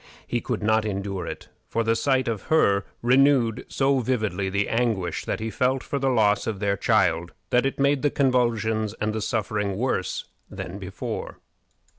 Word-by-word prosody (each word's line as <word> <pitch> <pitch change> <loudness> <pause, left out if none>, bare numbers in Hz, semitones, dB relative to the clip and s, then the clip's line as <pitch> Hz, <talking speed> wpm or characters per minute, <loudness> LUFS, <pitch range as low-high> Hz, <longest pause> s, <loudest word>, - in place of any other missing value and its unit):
He 120 - -2
could 115 -4 -3
not 110 +1 +3
endure 100 -3 -3
it, - - -7 0.2
for 115 - 0
the 115 0 +2
sight 130 +2 +1
of 115 -3 -1
her 100 -11 +3 0.2
renewed 125 -2 +3
so 135 0 +2
vividly 110 -5 -1
the 100 +2 0
anguish 110 -8 -1
that - - -2
he 110 +1 -3
felt 130 +2 +1
for 140 - -3
the 135 0 +1
loss 105 -5 +2
of 110 -3 -2
their 100 -1 +1
child, 85 -6 +1 0.2
that 125 +2 +3
it 135 - -4
made 140 0 +3
the 145 - +3
convulsions 115 -5 +1
and 105 0 -1
the 110 - -2
suffering 105 -2 -1
worse 105 -6 -1 0.2
than 95 0 -7
before. 95 -1 -5
110 Hz, 175 wpm, -25 LUFS, 100-125 Hz, 0.2 s, not